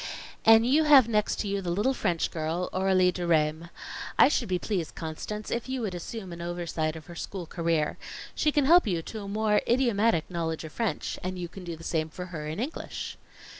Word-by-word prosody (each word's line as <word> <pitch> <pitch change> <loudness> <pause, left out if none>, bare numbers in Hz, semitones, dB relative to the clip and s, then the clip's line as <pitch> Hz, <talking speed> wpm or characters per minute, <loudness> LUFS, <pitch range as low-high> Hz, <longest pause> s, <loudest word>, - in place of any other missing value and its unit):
"And 225 0 +8
you 295 +5 +4
have 280 -6 +8
next 210 -2 +1
to 210 - -3
you 200 0 -1
the 180 - -4
little 205 +10 +1
French 175 -9 0
girl, 165 +3 -2
Aurelie 185 -1 +3
Deraismes. 165 -2 0 0.5
I - - +7
should 240 -7 0
be 180 - +2
pleased, 180 -3 -3
Constance, 185 +7 -5
if 235 +2 -2
you 260 -1 -2
would 210 -5 -2
assume 185 +2 -6
an 170 - -8
oversight 170 -2 -2
of 160 -2 -9
her 175 - -10
school 180 +1 -5
career. 165 -2 -1 0.3
She 305 - +2
can 290 -2 +2
help 340 -2 +6
you 170 -4 0
to 220 +4 -6
a 200 - -7
more 210 +1 +2
idiomatic 230 -8 +2
knowledge 165 -2 -3
of 160 - -8
French 230 -3 -2
and 185 0 -3
you 175 -1 -4
can 180 +2 -10
do 170 -1 -5
the 165 - -13
same 160 -1 -1
for 180 +3 -7
her 150 -2 -4
in 155 +4 -4
English. 275 +8 -5
185 Hz, 210 wpm, -28 LUFS, 165-220 Hz, 0.5 s, And